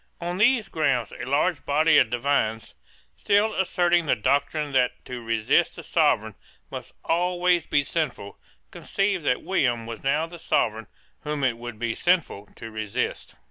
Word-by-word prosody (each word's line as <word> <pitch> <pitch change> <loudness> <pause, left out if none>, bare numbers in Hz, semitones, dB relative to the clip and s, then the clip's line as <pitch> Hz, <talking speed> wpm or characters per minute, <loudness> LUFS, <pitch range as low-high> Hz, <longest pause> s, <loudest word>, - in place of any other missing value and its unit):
On 175 +1 -4
these 235 0 +3
grounds 135 -8 0
a - - -7
large 150 +4 +1
body 155 +2 +4
of 125 - +3
divines, 120 -3 -1 0.4
still 205 +2 +2
asserting 175 -3 +1
the - - +3
doctrine 140 +5 0
that 130 -2 0
to 125 -1 -7
resist 115 -1 +1
the - - -9
Sovereign - - +1 0.4
must - - -8
always 175 0 +1
be 145 - +2
sinful, 140 -10 -4 0.3
conceived 195 -3 -1
that 125 - +1
William 125 -11 0
was 115 0 -8
now 150 +4 +1
the 170 +1 -11
Sovereign 110 -7 0 0.4
whom 150 -2 -3
it 125 -3 +2
would 120 -1 -8
be 115 0 -2
sinful 170 - 0
to 110 - -9
resist. 110 -2 -4
145 Hz, 155 wpm, -25 LUFS, 120-175 Hz, 0.4 s, body